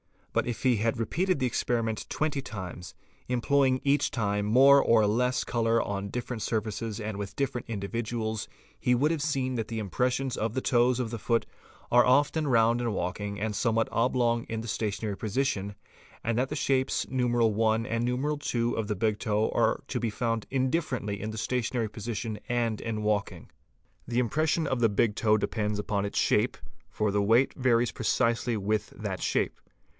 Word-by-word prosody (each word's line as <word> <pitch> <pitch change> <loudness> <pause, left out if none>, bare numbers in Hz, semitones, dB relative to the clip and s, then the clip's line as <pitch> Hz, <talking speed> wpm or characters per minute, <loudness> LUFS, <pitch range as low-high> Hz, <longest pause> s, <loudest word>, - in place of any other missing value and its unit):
But - - +1
if 120 - -4
he 125 -3 +4
had 115 +3 0
repeated 180 - 0
the 130 - 0
experiment 115 -2 -1
twenty 150 -3 -1
times, 95 -7 -7 0.3
employing 130 +2 +2
each 140 0 +2
time 105 -3 -1
more 135 +5 +7
or 110 -2 +4
less 125 +5 +1
colour 115 -1 +1
on 100 0 -3
different 125 0 -4
surfaces 110 0 -2
and 105 -1 -4
with 100 -1 -6
different 135 -3 -2
individuals, 110 +1 -3 0.3
he 125 - +2
would 145 +6 +2
have 165 -3 -1
seen 135 -4 -1
that 115 -2 -2
the 115 - -5
impressions 125 +5 -1
of 110 0 -1
the 130 - -1
toes 125 0 +3
of 115 -3 -4
the 115 - -4
foot 115 +2 +1 0.5
are 120 0 +6
often 145 +4 +3
round 115 -2 +3
in 115 -3 -1
walking 100 +3 -3
and 105 0 -2
'somewhat 115 0 +1
oblong 120 -1 +1
in 115 -1 -4
the 115 - -7
stationary 105 -1 -2
position, 105 -3 -1 0.5
and 115 0 0
that 130 +2 +1
the 150 - -3
shapes 135 -2 +1
I. - - -16
and 130 - -1
II. 120 +3 +1
of 110 -2 -2
the 105 - -1
big 105 +1 0
toe 110 -1 +1
are - - +1
to - - -1
be 115 - -1
found 115 0 -2
indifferently 130 - -1
in 110 - -3
the 110 - -7
stationary 120 0 -1
position 110 0 -4
and 115 -3 0
in 110 -2 -3
walking. 105 -1 -2 0.6
The 120 +1 0
impression 155 +6 +1
of 130 - -1
the 115 -1 +4
big 105 +1 +2
toe 110 0 +3
depends 105 0 -1
upon 100 -1 -1
its 100 - -4
shape, - - +2 0.3
for 105 -1 -1
the 100 0 +1
weight 115 +6 +3
varies 120 -2 +2
precisely 115 0 0
with 105 +1 -1
that - - -5
shape. - - 0
115 Hz, 180 wpm, -28 LUFS, 110-125 Hz, 0.6 s, more